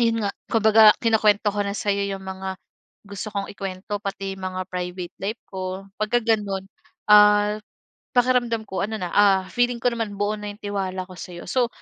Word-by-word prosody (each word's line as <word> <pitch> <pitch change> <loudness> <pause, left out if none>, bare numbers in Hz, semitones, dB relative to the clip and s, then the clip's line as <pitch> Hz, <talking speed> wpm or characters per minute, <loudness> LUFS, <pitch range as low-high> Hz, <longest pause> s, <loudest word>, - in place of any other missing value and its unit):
'yon 230 -2 +2
nga, 200 - -1 0.2
kumbaga, 220 -1 +6
kinukwento 210 -2 +3
ko 205 - -2
na 200 0 -2
sa'yo 200 -1 0
'yong 195 -1 -5
mga 190 0 -5 0.5
gusto 200 +1 -6
kong 200 -1 -4
ikwento, 195 +1 -5
pati 195 -1 -4
mga 185 0 -3
private 180 0 -4
life 210 +5 -4
ko, 185 0 -5 0.2
pagka 215 +3 +2
gano'n, 205 -4 0 0.4
ah, 210 0 +6 0.6
pakiramdam 245 -2 +2
ko, 190 - -4
ano 220 +2 -2
na 180 -3 -4
ah, 195 -2 +4
feeling 245 0 +1
ko 245 - +2
naman 225 -3 -3
buo 205 +1 0
na 210 - -5
'yong 205 +2 -12
tiwala 190 -2 -2
ko 185 - -13
sa'yo. 175 -1 -8
So 250 -2 +1
205 Hz, 180 wpm, -23 LUFS, 190-215 Hz, 0.6 s, kumbaga